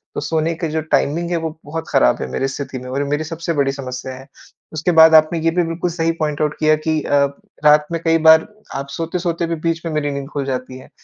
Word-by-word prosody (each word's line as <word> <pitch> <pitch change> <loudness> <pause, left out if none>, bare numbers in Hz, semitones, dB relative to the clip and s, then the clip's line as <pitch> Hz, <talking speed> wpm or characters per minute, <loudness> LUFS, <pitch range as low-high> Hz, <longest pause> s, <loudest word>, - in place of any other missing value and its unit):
तो - - -1
सोने 160 +2 0
का 165 0 -3
जो 160 +1 -1
टाइमिंग 155 +2 0
है, 170 - +1
वो 160 0 -2 0.2
बहुत 160 +2 -5
खराब - - +3
है - - -3
मेरी 135 - -1
स्थिति 135 -1 -5
में 125 +1 -9
और 135 +2 -2
ये 145 - -2
मेरी 150 +2 0
सबसे 165 +1 -4
बड़ी 140 -2 +1
समस्या 130 -1 -6
है। 130 +1 -12 0.5
उसके 160 +3 0
बाद 160 -1 +7
आपने 155 +2 +4
ये 165 +1 +1
भी 175 +1 +1
बिल्कुल 165 +2 -2
सही 165 -1 0
पॉइंट 150 -1 -1
आउट 150 -1 0
किया 155 0 +4
कि 155 -1 +2
अ, 145 - 0 0.5
रात 150 0 +6
में 165 - -1
कई 165 0 +3
बार 160 0 +7 0.3
आप 140 +1 -4
सोते-सोते 170 +2 -2
भी 165 - -2
बीच 165 +1 -2
में 165 - -2
मेरी 145 -1 -1
नींद 140 -1 -5
खुल 140 -2 -2
जाती 130 -1 -4
है। 130 - -14
155 Hz, 250 wpm, -19 LUFS, 140-165 Hz, 0.5 s, बाद